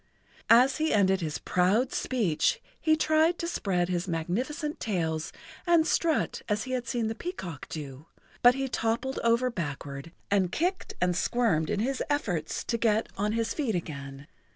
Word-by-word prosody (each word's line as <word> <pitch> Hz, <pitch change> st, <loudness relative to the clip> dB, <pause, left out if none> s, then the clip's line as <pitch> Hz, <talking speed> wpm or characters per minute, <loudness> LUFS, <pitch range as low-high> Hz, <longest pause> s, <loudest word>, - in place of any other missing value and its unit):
As 250 Hz, +4 st, +6 dB
he 315 Hz, +1 st, +1 dB
ended 190 Hz, -2 st, +3 dB
his 155 Hz, -3 st, -2 dB
proud 200 Hz, +8 st, +1 dB
speech 215 Hz, -12 st, +1 dB, 0.2 s
he 315 Hz, -1 st, +3 dB
tried 315 Hz, +2 st, +3 dB
to -, -, -3 dB
spread 185 Hz, -, 0 dB
his 180 Hz, +1 st, -2 dB
magnificent 245 Hz, -, -2 dB
tails 160 Hz, -7 st, -2 dB, 0.4 s
and 340 Hz, -2 st, +5 dB
strut 325 Hz, -1 st, +1 dB
as 210 Hz, 0 st, 0 dB
he 260 Hz, -, -6 dB
had 250 Hz, -2 st, -2 dB
seen 240 Hz, -3 st, -1 dB
the 220 Hz, -, -1 dB
peacock 220 Hz, -, -6 dB
do, 145 Hz, -1 st, -7 dB, 0.3 s
but 245 Hz, +1 st, +7 dB
he 270 Hz, 0 st, -1 dB
toppled 235 Hz, +2 st, -1 dB
over 235 Hz, +2 st, +3 dB
backward 145 Hz, -5 st, -5 dB, 0.2 s
and 190 Hz, -3 st, +2 dB
kicked 365 Hz, -, -1 dB
and 180 Hz, -1 st, +1 dB
squirmed 200 Hz, -8 st, +1 dB
in 205 Hz, -, 0 dB
his 265 Hz, +3 st, -1 dB
efforts 180 Hz, -, -1 dB
to 230 Hz, -, -2 dB
get 220 Hz, -1 st, +2 dB
on 210 Hz, +2 st, 0 dB
his 230 Hz, 0 st, 0 dB
feet 260 Hz, -9 st, -1 dB
again. 140 Hz, -4 st, -6 dB
220 Hz, 165 wpm, -28 LUFS, 175-265 Hz, 0.4 s, but